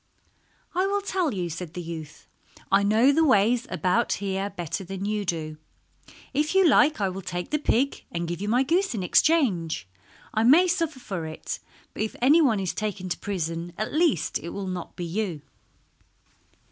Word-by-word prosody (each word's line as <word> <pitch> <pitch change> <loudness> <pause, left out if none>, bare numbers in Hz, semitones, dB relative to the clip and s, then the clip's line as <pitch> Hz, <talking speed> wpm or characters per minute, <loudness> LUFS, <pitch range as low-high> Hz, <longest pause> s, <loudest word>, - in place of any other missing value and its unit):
"I 370 +2 +1
will 400 0 0
tell 370 -6 0
you," 180 -4 -2
said 170 0 -7
the 180 - -4
youth; 160 -2 -8 0.4
"I 195 +1 +5
know 220 +7 +4
the 320 +3 +3
ways 240 -1 +3
about 180 -1 +1
here 195 0 -2
better 180 0 -4
than 195 +1 -5
you 210 0 -1
do. 155 -3 -3 0.8
If 300 +6 0
you 385 -2 +6
like 300 -1 +4
I 200 - +1
will 190 +1 -5
take 175 -1 -5
the 300 - +1
pig 275 -1 0
and 170 0 -3
give 175 +1 -4
you 205 - -2
my 245 +4 +3
goose 350 +2 +1
in 195 - -2
exchange. 180 - +2 0.5
I 220 - +1
may 300 +11 +6
suffer 330 -5 -1
for 185 -9 -5
it, 155 - -6 0.3
but - - -5
if 220 - -2
anyone 265 -4 +4
is 190 -3 -2
taken 205 -3 -4
to - - -3
prison 170 -3 -3
at 215 - -3
least 310 - +1
it 170 - -7
will 200 +1 -5
not 185 -2 -5
be 175 - -4
you." 170 -3 -3
200 Hz, 185 wpm, -26 LUFS, 175-280 Hz, 0.8 s, you